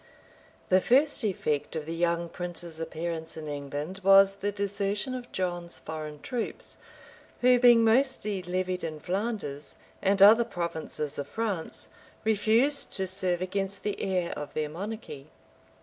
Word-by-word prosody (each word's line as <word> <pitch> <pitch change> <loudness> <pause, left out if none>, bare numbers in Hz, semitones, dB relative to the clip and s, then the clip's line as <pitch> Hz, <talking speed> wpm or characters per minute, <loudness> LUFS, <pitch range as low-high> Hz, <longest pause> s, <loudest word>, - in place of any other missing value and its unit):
The 185 0 +5
first 280 +4 +3
effect 155 -8 -1
of 155 -2 -3
the 165 - -4
young 170 0 0
prince's 175 -1 -5
appearance 165 0 -4
in 155 -1 -6
England 145 +6 -5
was 195 0 +7
the 205 +1 -1
desertion 200 +4 -2
of 250 -1 -6
John's 175 -2 -3
foreign 155 -1 -6
troops, 245 -3 -5 0.6
who, 250 0 +6
being 240 -2 +7
mostly 225 -4 +2
levied 180 0 -2
in 155 -2 -4
Flanders, 185 -6 -3 0.3
and 195 +1 +2
other 215 +4 +8
provinces 160 -6 -4
of 140 - -3
France, 205 -6 -2 0.3
refused 220 +6 +2
to 190 - -1
serve 185 -1 -1
against 195 +1 -3
the 205 - -2
heir 180 -3 0
of 150 - -7
their 155 -1 -1
monarchy. 180 -5 -7
185 Hz, 140 wpm, -28 LUFS, 165-210 Hz, 0.6 s, other